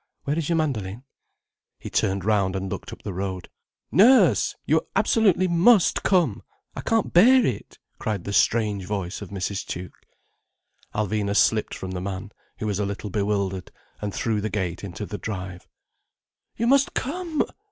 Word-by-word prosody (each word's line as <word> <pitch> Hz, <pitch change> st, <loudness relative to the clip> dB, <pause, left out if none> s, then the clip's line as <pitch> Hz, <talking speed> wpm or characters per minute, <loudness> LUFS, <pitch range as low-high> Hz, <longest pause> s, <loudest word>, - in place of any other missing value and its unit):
Where 145 Hz, -, -1 dB
is 165 Hz, -1 st, -2 dB
your 170 Hz, -, +2 dB
mandoline?" 120 Hz, -8 st, -2 dB, 0.7 s
He -, -, -9 dB
turned 95 Hz, -1 st, 0 dB
round 100 Hz, -3 st, +2 dB
and 95 Hz, -1 st, -3 dB
looked -, -, -6 dB
up -, -, -11 dB
the 100 Hz, -, -4 dB
road. 95 Hz, -1 st, -4 dB, 0.4 s
"Nurse! 250 Hz, +7 st, +5 dB
You -, -, +1 dB
absolutely 195 Hz, -5 st, +3 dB
must 180 Hz, +4 st, +4 dB
come. 185 Hz, -3 st, +2 dB, 0.3 s
I -, -, -4 dB
can't 225 Hz, -3 st, 0 dB
bear 245 Hz, +8 st, +7 dB
it," -, -, -4 dB, 0.2 s
cried 105 Hz, -5 st, -2 dB
the 100 Hz, -, -4 dB
strange 105 Hz, -3 st, +2 dB
voice 100 Hz, -1 st, -4 dB
of 100 Hz, -, -7 dB
Mrs. 95 Hz, +1 st, -3 dB
Tuke. 90 Hz, 0 st, -7 dB, 1.0 s
Alvina 105 Hz, -1 st, 0 dB
slipped 110 Hz, +1 st, +2 dB
from 95 Hz, -, -6 dB
the 90 Hz, -1 st, -4 dB
man, 95 Hz, +1 st, -5 dB, 0.3 s
who -, -, -4 dB
was 105 Hz, -2 st, -1 dB
a 105 Hz, -, 0 dB
little 100 Hz, 0 st, -5 dB
bewildered, 100 Hz, -2 st, -1 dB, 0.3 s
and 105 Hz, -1 st, -2 dB
through 110 Hz, 0 st, -1 dB
the 110 Hz, -, -2 dB
gate 95 Hz, -4 st, -3 dB
into 100 Hz, +2 st, -5 dB
the 105 Hz, 0 st, -6 dB
drive. 95 Hz, -4 st, -6 dB, 0.9 s
"You 230 Hz, -, 0 dB
must 275 Hz, +3 st, +3 dB
come!" 325 Hz, +2 st, -1 dB
105 Hz, 165 wpm, -24 LUFS, -, 1.0 s, bear